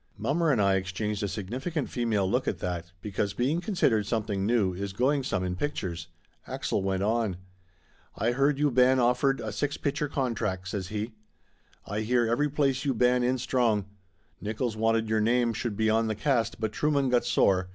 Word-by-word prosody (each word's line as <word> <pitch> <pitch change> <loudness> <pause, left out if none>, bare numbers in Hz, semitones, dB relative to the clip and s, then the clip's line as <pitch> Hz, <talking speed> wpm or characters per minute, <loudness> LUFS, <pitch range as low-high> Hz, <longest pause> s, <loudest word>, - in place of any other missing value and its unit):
Mommer 160 +2 +1
and 125 - +2
I 100 -1 +3
exchanged 100 +2 -3
a 100 - 0
significant 130 - -3
female 110 -6 0
look - - 0
at - - 0
that, 85 -1 -4
because 100 -1 -2
being 140 +9 +1
considered 135 - +1
something 105 -3 -1
new 110 -6 +2
is 100 +2 -4
going 135 +7 +2
some 95 -8 -1
in 90 0 -2
pictures. 90 - -3 0.4
Axel - - -2
went 95 0 -1
on. 110 -3 0 0.8
"Ay 115 +3 +1
heard 140 +3 +2
you 145 0 +2
ban 130 +1 +5
offered 125 +3 +2
a - - -4
six 145 0 -2
picture 145 +1 -1
contract," 115 -9 -2
says 95 -3 -3
he. 110 +3 -4 0.7
"Ay 105 +2 -3
hear 120 +2 +2
every 145 +6 +1
place 135 -2 +1
you 135 -3 0
ban 125 +2 +3
in 125 +1 +1
strong. 120 -5 +1 0.6
Nickolls 110 +2 -2
wanted 115 0 +1
your 110 0 +1
name 120 +1 +2
should 110 -2 -3
be 110 0 +2
on 110 +1 +2
the 110 - -1
cast 120 -5 0
but 110 -1 -1
Trueman 140 +2 +1
got 120 -1 +3
sore. 95 -1 +2
115 Hz, 185 wpm, -28 LUFS, 100-130 Hz, 0.8 s, ban